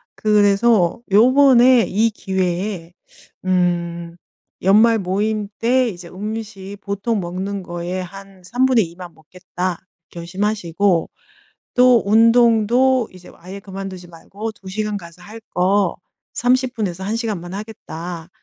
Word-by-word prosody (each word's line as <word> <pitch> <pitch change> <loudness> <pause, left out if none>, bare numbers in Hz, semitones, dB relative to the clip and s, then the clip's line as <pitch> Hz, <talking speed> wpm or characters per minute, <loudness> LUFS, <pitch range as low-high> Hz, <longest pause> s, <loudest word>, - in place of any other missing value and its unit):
그래서 210 -2 +3
요번에 250 +1 +6
이 220 +4 +2
기회에 185 -3 -3 0.5
음 170 -2 -1 0.5
연말 220 +5 +5
모임 205 +2 -1
때 250 +2 +2
이제 175 -4 -9
'음식 205 0 -7
보통 200 +3 -2
먹는 190 +3 -4
거에 175 +1 -5
한 195 +1 -11
3 245 +8 0
분의 250 -6 +3
2 170 - -16
만 175 -2 -10
먹겠다.' 180 +2 -6 0.3
결심하시고, 185 0 -1 0.7
또 250 -2 +5
운동도 230 +3 +4
이제 185 -1 -14
아예 185 +3 -10
그만두지 195 -2 -8
말고 200 +6 -7
'2 195 -3 -14
시간 210 +2 -3
가서 170 -2 -11
할 215 +4 -11
거 190 +1 +1 0.4
30 255 +1 +1
분에서 190 -5 -3
1 210 +3 -2
시간만 205 -7 -4
하겠다.', 175 -5 -7
200 Hz, 220 characters per minute, -19 LUFS, 180-225 Hz, 0.7 s, 요번에